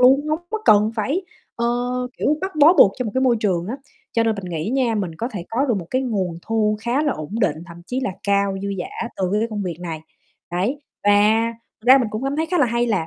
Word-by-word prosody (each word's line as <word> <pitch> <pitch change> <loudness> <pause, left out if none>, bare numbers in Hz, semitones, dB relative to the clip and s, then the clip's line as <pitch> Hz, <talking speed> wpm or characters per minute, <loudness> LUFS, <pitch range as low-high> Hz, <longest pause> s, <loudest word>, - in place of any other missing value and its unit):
luôn, 270 +4 +5
hông 310 +1 +1
có 440 - -1
cần 210 +1 +5
phải, 275 - 0 0.3
ờ, 235 - 0 0.5
kiểu, 300 - +2
bắt 380 +1 -3
bó 305 +3 +7
buộc 200 - +6
cho 255 - -1
một 220 - -3
cái 260 - +2
môi 255 -3 +3
trường 180 -5 0
á. 235 +6 -4 0.4
Cho 230 - +2
nên 225 -1 +1
mình 200 -2 -7
nghĩ 170 +2 -3
nha, 255 -3 +1
mình 185 -6 -2
có 230 +8 -3
thể 180 -5 -5
có 255 +5 +1
được 245 - +2
một 170 - -7
cái 255 +1 +1
nguồn 190 -9 -2
thu 215 -1 +1
khá 240 +6 0
là 295 -3 +1
ổn 155 -1 -7
định, 200 - +2
thậm 170 -2 -11
chí 255 +1 -2
là 255 - -1
cao, 200 -1 +1
dư 200 - -2
dả 230 +6 -4
từ 190 - -1 0.2
cái 225 - +1
công 210 -2 -3
việc 175 -4 -4
này, 165 -3 -5 0.5
đấy. 200 +12 -1 0.2
Và 205 - +5 0.7
ra 260 +2 +9
mình 245 -4 0
cũng 215 +4 -4
cảm 275 +1 -1
thấy 320 +1 0
khá 355 +2 0
là 285 - +4
hay 235 +1 0
là 200 -8 0
225 Hz, 255 wpm, -21 LUFS, 195-260 Hz, 0.7 s, ra